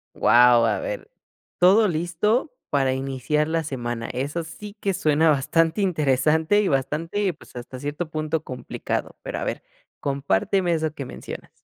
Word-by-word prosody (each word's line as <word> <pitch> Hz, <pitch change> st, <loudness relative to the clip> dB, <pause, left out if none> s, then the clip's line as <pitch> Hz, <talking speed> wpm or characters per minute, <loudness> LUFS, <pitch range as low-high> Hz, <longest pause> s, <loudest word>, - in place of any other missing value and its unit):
Guau, 120 Hz, +1 st, +6 dB
a -, -, +1 dB
ver, -, -, -5 dB, 0.5 s
todo 200 Hz, +5 st, +6 dB
listo 180 Hz, -, 0 dB, 0.2 s
para 135 Hz, -2 st, +2 dB
iniciar 135 Hz, +3 st, -1 dB
la 165 Hz, 0 st, 0 dB
semana, 120 Hz, -5 st, -4 dB
eso 145 Hz, +6 st, -3 dB
sí 205 Hz, +6 st, -10 dB
que 195 Hz, -2 st, 0 dB
suena 155 Hz, +1 st, +3 dB
bastante 165 Hz, +6 st, +2 dB
interesante, 160 Hz, +2 st, +2 dB
y 205 Hz, -, 0 dB
bastante, 165 Hz, +8 st, 0 dB
pues, -, -, -18 dB
hasta 125 Hz, +1 st, -8 dB
cierto 145 Hz, +4 st, -4 dB
punto 155 Hz, 0 st, -2 dB
complicado. 130 Hz, -4 st, -4 dB
Pero -, -, -5 dB
a -, -, -3 dB
ver, -, -, -3 dB, 0.4 s
compárteme 140 Hz, -, +1 dB
eso 160 Hz, -1 st, -1 dB
que 140 Hz, -, -5 dB
mencionas. -, -, -8 dB
155 Hz, 150 wpm, -24 LUFS, 135-175 Hz, 0.5 s, Guau